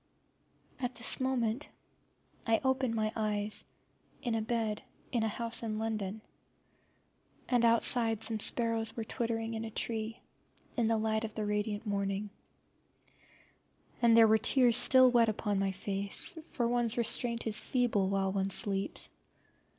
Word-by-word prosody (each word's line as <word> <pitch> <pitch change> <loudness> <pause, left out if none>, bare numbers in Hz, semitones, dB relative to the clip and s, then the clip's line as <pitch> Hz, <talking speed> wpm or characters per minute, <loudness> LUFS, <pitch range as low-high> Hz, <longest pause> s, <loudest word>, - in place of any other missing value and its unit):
At 250 -1 -3
this 235 - +1
moment 260 0 -1 0.8
I 225 0 +3
opened 260 -3 0
my 215 0 -1
eyes 210 -1 -1 0.6
in 225 -4 -1
bed 220 -2 -2 0.3
in 235 - 0
a 220 - 0
house 230 +2 -3
in 220 -2 -4
London, 215 -2 -4 1.3
and 245 -2 +1
outside 230 -1 +3
some 220 -2 +1
sparrows 230 0 +1
were 225 - -2
twittering 225 0 -3
in 220 0 -4
a 225 - -5
tree 225 +1 -4 0.6
in 235 -2 +1
the 225 0 +1
light 220 0 -1
of 220 -1 -6
the 215 - -3
radiant 210 +1 -2
morning; 200 0 -3 1.7
and 230 -1 +5
there 225 -1 +7
were 220 0 +4
tears 245 -2 +4
still 255 0 +7
wet 235 -2 +4
upon 210 -2 -2
my 195 0 0
face, 195 - +1 0.2
for 240 -3 -1
one's 240 -1 -1
restraint 235 0 0
is 220 -2 +2
feeble 230 -7 0
while 195 -1 0
one 195 -1 -1
sleeps. 195 0 0
225 Hz, 145 wpm, -31 LUFS, 210-235 Hz, 1.7 s, there